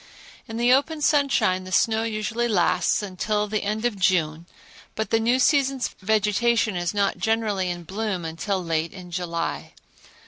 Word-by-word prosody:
In 225 -1 -6
the 240 +1 +4
open 300 +4 +1
sunshine 255 -12 +2
the 185 - -9
snow 220 +4 +2
usually 225 +1 -2
lasts 210 0 +2
until 210 +2 -1
the 215 0 -1
end 215 +3 -2
of 220 -5 -1
June 170 -3 +1 0.5
but 220 - -3
the 225 - +3
new 235 +3 +2
season's 270 -2 +2
vegetation 215 +1 +1
is 175 -1 -1
not 200 -1 0
generally 215 -4 0
in 175 -1 -5
bloom 195 0 -3
until 165 +4 -3
late 165 -1 -1
in 180 -2 -11
July. 170 -1 -3
210 Hz, 160 wpm, -24 LUFS, 180-225 Hz, 0.5 s, the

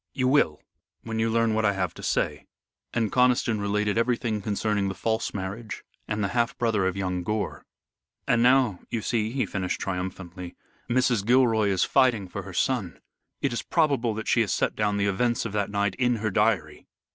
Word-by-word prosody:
"You 130 -2 0
will, 130 - +3 0.4
when 110 -1 -4
you 115 0 +1
learn 115 0 +2
what 110 +1 +1
I 100 -1 +3
have 90 -3 -2
to - - -11
say." - - -1 0.4
And 115 -3 0
Conniston 125 -4 +2
related 105 +1 0
everything 115 -3 0
concerning 105 0 0
the 95 - -5
false 110 +4 -1
marriage 100 +3 -6 0.2
and 105 -1 -1
the 100 - 0
half 120 +1 0
brother 110 -5 +1
of 95 +1 -2
young 90 -2 -2
Gore. 105 +3 -3 0.6
"And 115 - +3
now, 125 -6 +4
you 115 -3 -3
see," 110 -2 0
he 130 +3 -1
finished 95 -2 -3
triumphantly, 90 -1 -5 0.3
"Mrs. 125 -3 +2
Gilroy 115 -2 +3
is 95 -2 +2
fighting 120 -7 +2
for 100 +3 -6
her 95 - -9
son. 100 -2 -1 0.5
It 135 -4 +1
is 120 - -2
probable 140 -9 +1
that 110 - -5
she 120 - +3
has 105 -5 0
set - - 0
down 105 -1 0
the 100 - +1
events 115 +5 0
of 115 - -3
that 100 -1 -1
night 100 -1 0
in 125 -1 +3
her 110 -1 -2
diary." 100 -7 0
110 Hz, 190 wpm, -26 LUFS, 100-120 Hz, 0.6 s, now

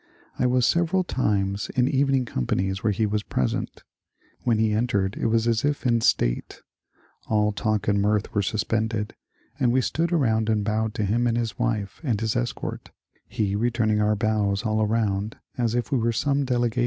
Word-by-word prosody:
I 125 - +3
was 125 -1 +3
several 170 +4 +2
times 100 - -1
in 125 0 +3
evening 135 -1 +2
companies 95 - -1
whete 105 -1 0
he 110 - +1
was 105 0 0
present. 65 -10 -2 0.6
When 115 -3 +1
he 110 -1 +2
entered 105 -3 0
it - - -1
was 115 +1 +2
as 115 0 +1
if 145 -1 -1
in 115 -2 +3
state; - - 0 0.6
all 105 -1 +2
talk 105 -1 -1
and 100 -1 +2
mirth 105 +1 0
were 105 - +2
suspended, 110 +1 -1 0.5
and 120 - +3
we 130 - +3
stood 165 +6 -1
around 110 -9 +2
and 110 -2 +1
bowed 110 0 -1
to 105 - 0
him 120 +5 +1
and 115 0 +1
his 115 -1 -3
wife 110 -5 -2
and 120 -8 0
his 110 -1 -1
escort, - - -3 0.4
he 105 -3 -1
returning 110 -1 +1
our 105 0 +2
bows 105 -1 0
all 110 0 +1
around 105 -1 0 0.2
as 120 -2 0
if 120 +2 -2
we 135 - +2
were 115 +1 +1
some 140 +4 +1
delegation. 120 -2 0
110 Hz, 185 wpm, -25 LUFS, 105-120 Hz, 0.6 s, I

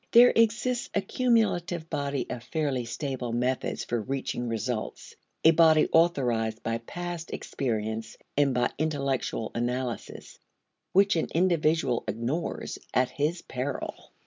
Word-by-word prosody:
There 245 +1 +8
exists 235 +2 +2
a 200 - +3
cumulative 190 -7 +1
body 140 -3 -2
of 120 - -4
fairly 140 -4 -1
stable 125 0 -3
methods 125 +2 -1
for 120 -1 -1
reaching 130 0 -3
results, 115 0 -3 0.3
a 160 - +8
body 160 -1 +5
authorized 120 -10 +2
by 115 0 -1
past 175 +6 -6
experience 110 -3 -3 0.2
and 145 -1 +3
by 125 -1 +1
intellectual 140 -7 -1
analysis, 120 +1 -4 0.5
which 195 +1 +4
an 160 - 0
individual 160 -7 +2
ignores 130 +10 -3 0.2
at 125 0 +3
his 155 +5 -1
peril. 130 +2 -5
140 Hz, 120 wpm, -28 LUFS, 120-170 Hz, 0.5 s, There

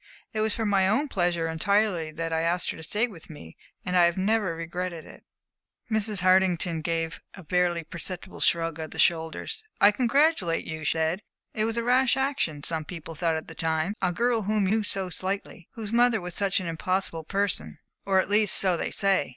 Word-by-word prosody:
It 215 - -2
was 215 -1 +3
for 225 - -2
my 195 -2 +3
own 275 +9 +1
pleasure 175 -4 0
entirely 180 0 +1
that 165 +1 -4
I 160 - +1
asked 170 +1 0
her - - -9
to - - -9
stay 210 +9 +1
with 190 -10 -11
me, 80 - -11 0.3
and 180 - -1
I 175 -1 +6
have 170 +1 +1
never 195 -2 +1
regretted 170 0 -5
it." - - -14 0.7
Mrs. 215 -3 0
Hartington 180 -3 +3
gave 165 +1 -2
a 190 - -11
barely 175 0 +1
perceptible 175 +3 -6
shrug 165 -1 +1
of 160 -1 -5
the - - -10
shoulders. 165 - 0 0.2
"I 205 - +7
congratulate 245 - +2
you," 160 -1 -5
she - - +2
said. 160 +4 0 0.3
"It 215 - 0
was 225 +1 -2
a 235 - 0
rash 250 +1 +3
action, 265 - -1
some 160 0 -1
people 165 -1 -8
thought 165 +1 0
at 160 - -5
the - - -8
time. 160 +3 -1
A 180 - +2
girl 235 +4 +1
whom 210 0 +1
you 215 +4 +2
knew 220 - -1
so 190 -2 -2
slightly, 185 -2 -4
whose 220 -1 -5
mother 240 -1 +4
was 180 -1 -6
such 200 0 +1
an 185 - -5
impossible 165 0 -2
person 200 +4 -2 0.3
or 195 -1 +3
at - - +1
least, 210 +1 +3
so 185 -2 +3
they - - -2
say. 195 -6 +2
185 Hz, 210 wpm, -26 LUFS, 165-210 Hz, 0.7 s, I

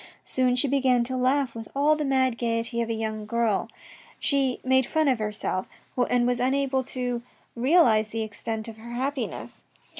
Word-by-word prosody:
Soon 255 -1 +1
she 250 +3 +3
began 260 -3 +3
to 260 +2 -3
laugh 255 0 +1
with 225 -1 -7
all 295 +2 +4
the 305 - -2
mad 260 -3 +1
gaiety 235 0 -1
of 230 - -2
a 230 - 0
young 220 -1 -4
girl, 230 -2 0 0.5
she 270 -3 +1
made 260 -1 +3
fun 315 -1 +1
of 255 -4 +2
herself, 210 -3 -2 0.4
and 245 -1 +3
was 245 0 +1
unable 265 +1 +1
to 250 -2 -3 0.3
realise 240 -5 +4
the 225 +1 -3
extent 220 +1 -5
of 225 -1 -9
her 235 +2 -9
happiness. 270 +3 -4
245 Hz, 175 wpm, -26 LUFS, 230-265 Hz, 0.5 s, all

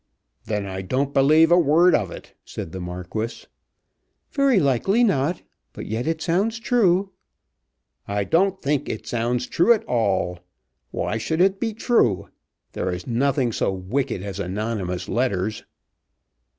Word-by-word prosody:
"Then 105 -2 -2
I 95 -1 -5
don't 130 +8 -1
believe 155 +4 +5
a 175 - +7
word 170 +3 +4
of 100 -6 +1
it," - - -11
said 80 - -7
the 95 - -6
Marquis. 90 +6 -5 0.9
"Very 275 -6 +3
likely 170 - +2
not; 170 - +1 0.3
but - - -7
yet 115 +5 -3
it 160 -1 -1
sounds 200 +6 0
true." 200 -5 +2 1.0
"I 100 0 -1
don't 190 - +1
think 145 -3 -1
it 110 - -5
sounds 120 +1 -1
true 205 - +4
at 220 -1 -2
all. 95 - 0 0.5
Why 110 - -2
should 160 +8 -2
it 190 +1 +3
be 225 -2 -2
true? 115 - +1 0.4
There - - -3
is 90 0 -5
nothing 130 +1 +1
so 105 - 0
wicked 95 +4 -2
as 100 0 -6
anonymous 95 -1 -3
letters." 110 -4 -1
130 Hz, 145 wpm, -23 LUFS, -, 1.0 s, a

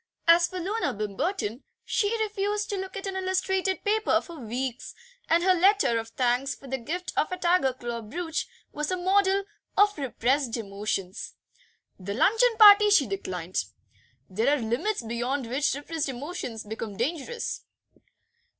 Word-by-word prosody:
As 340 +1 +6
for 370 +1 -6
Loona 370 - -1
Bimberton, 225 - -2 0.2
she 410 -1 +1
refused 415 0 -2
to - - -1
look 380 0 -5
at 390 - -5
an 385 -1 -4
illustrated 380 0 0
paper 425 -5 +2
for 335 -2 -11
weeks, 250 +2 -4 0.3
and 335 +1 +4
her 375 0 +5
letter 370 - +3
of 225 - -6
thanks 250 +3 0
for - - -16
the 265 0 -3
gift 350 +9 -4
of 310 - +1
a 365 - -2
tiger 345 -6 +3
claw 240 -2 -5
brooch 325 +9 -4 0.2
was 300 0 -3
a 370 - 0
model 385 +2 +2 0.3
of 410 +1 +5
repressed 255 -1 0
emotions. 200 -2 -4 0.6
The 200 +2 -5
luncheon 450 - +3
party 420 -1 +9
she 400 -9 +5
declined; 185 -4 -3 0.6
there 230 +10 +1
are - - -5
limits 245 - -1
beyond 240 +4 -2
which 270 +4 0
repressed 295 +1 -3
emotions 260 -4 -5
become 210 -1 -6
dangerous. 320 - -3
300 Hz, 150 wpm, -27 LUFS, 235-380 Hz, 0.6 s, party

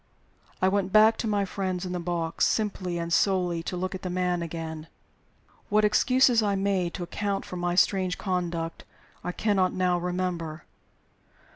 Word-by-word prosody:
I - - +6
went 195 0 +1
back 215 +2 +6
to 230 - -2
my 205 -2 +1
friends 185 -1 -3
in 180 - -4
the 180 - -2
box, 170 -1 0
simply 190 -5 -1
and 170 0 -2
solely 180 -4 +2
to 180 +2 -4
look 185 +1 -3
at 185 - -6
the 185 - -4
man 180 -1 0
again. 160 -1 -5 0.8
What 210 +1 +4
excuses 245 +2 +4
I 205 -2 +1
made 195 -3 0
to 180 - -4
account 200 +2 -3
for - - -7
my 175 0 -1
strange 185 -1 +2
conduct 175 -3 -3 0.4
I 180 - -2
cannot 190 -2 +1
now 180 -1 +1
remember. 175 -3 -3
185 Hz, 165 wpm, -27 LUFS, 175-200 Hz, 0.8 s, I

